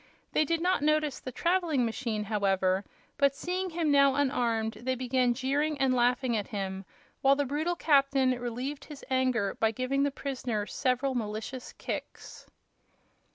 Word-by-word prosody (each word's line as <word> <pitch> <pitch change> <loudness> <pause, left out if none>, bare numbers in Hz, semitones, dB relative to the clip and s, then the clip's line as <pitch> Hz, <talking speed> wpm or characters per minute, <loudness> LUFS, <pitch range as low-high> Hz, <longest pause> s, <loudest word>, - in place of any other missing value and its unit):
They 310 - +3
did 330 +2 0
not 365 -1 +2
notice 305 -1 +1
his 255 - -6
traveling 335 -7 +1
machine, 225 -1 -2
however, 195 -2 +1 0.4
but 280 -1 +3
seeing 370 +4 -2
him 330 -3 0
now 280 -1 +5
unarmed 235 -5 0
they 260 +1 -1
began 250 -1 +1
jeering 285 +4 0
and 265 -1 +2
laughing 245 0 +2
at 210 -2 -2
him, 195 -2 -4 0.4
while 275 0 +5
the 285 0 0
brutal 310 +6 -1
captain 275 -4 +3
relieved 250 +3 -4
his 295 -3 -11
anger 255 -6 +1
by 220 - +1
giving 255 +5 -1
the 285 - +3
prisoner 255 -6 -3
several 260 +3 0
malicious 225 +2 -4
kicks. - - -7
260 Hz, 155 wpm, -29 LUFS, 235-285 Hz, 0.4 s, now